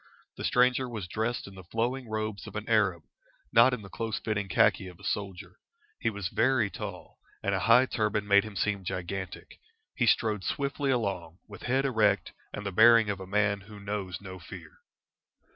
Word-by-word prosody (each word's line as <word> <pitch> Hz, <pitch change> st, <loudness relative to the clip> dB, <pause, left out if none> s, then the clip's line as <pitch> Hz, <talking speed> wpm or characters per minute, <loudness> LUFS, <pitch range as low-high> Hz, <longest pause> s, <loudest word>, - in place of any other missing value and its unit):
The -, -, -7 dB
stranger 125 Hz, +1 st, +3 dB
was 110 Hz, -6 st, -5 dB
dressed 110 Hz, +6 st, -2 dB
in 100 Hz, -, -11 dB
the 95 Hz, -1 st, -11 dB
flowing 120 Hz, +6 st, -2 dB
robes 110 Hz, -1 st, -3 dB
of -, -, -10 dB
an 110 Hz, 0 st, -4 dB
Arab, 95 Hz, -7 st, +2 dB
and -, -, -43 dB, 0.4 s
not 115 Hz, +3 st, +7 dB
in 125 Hz, -4 st, -4 dB
the -, -, -9 dB
close 115 Hz, 0 st, -3 dB
fitting 100 Hz, -3 st, -2 dB
khaki 95 Hz, -, +3 dB
of 90 Hz, -2 st, -12 dB
a -, -, -16 dB
soldier. 95 Hz, -3 st, -4 dB, 0.4 s
He -, -, +1 dB
was 100 Hz, -4 st, -4 dB
very 120 Hz, -6 st, +2 dB
tall, -, -, -8 dB, 0.2 s
and 100 Hz, -, 0 dB
a 95 Hz, -, +1 dB
high 115 Hz, +6 st, +6 dB
turban 105 Hz, -4 st, -1 dB
made 100 Hz, 0 st, +6 dB
him 110 Hz, -2 st, -9 dB
seem 100 Hz, -1 st, -1 dB
gigantic. 90 Hz, +1 st, -5 dB, 0.3 s
He 120 Hz, -, 0 dB
strode 105 Hz, -3 st, +2 dB
swiftly 140 Hz, 0 st, -1 dB
along, 100 Hz, -9 st, -1 dB
with 100 Hz, -, -11 dB
head 130 Hz, +3 st, +1 dB
erect, 105 Hz, -7 st, +2 dB, 0.2 s
and 105 Hz, -, -6 dB
the 100 Hz, -, -2 dB
bearing 115 Hz, +2 st, +6 dB
of 100 Hz, -, -5 dB
a 95 Hz, -, -8 dB
man 100 Hz, 0 st, +1 dB
who 105 Hz, +1 st, -12 dB
knows 100 Hz, -3 st, -4 dB
no 95 Hz, -2 st, -9 dB
fear. 85 Hz, -2 st, -11 dB
105 Hz, 195 wpm, -29 LUFS, 95-115 Hz, 0.4 s, not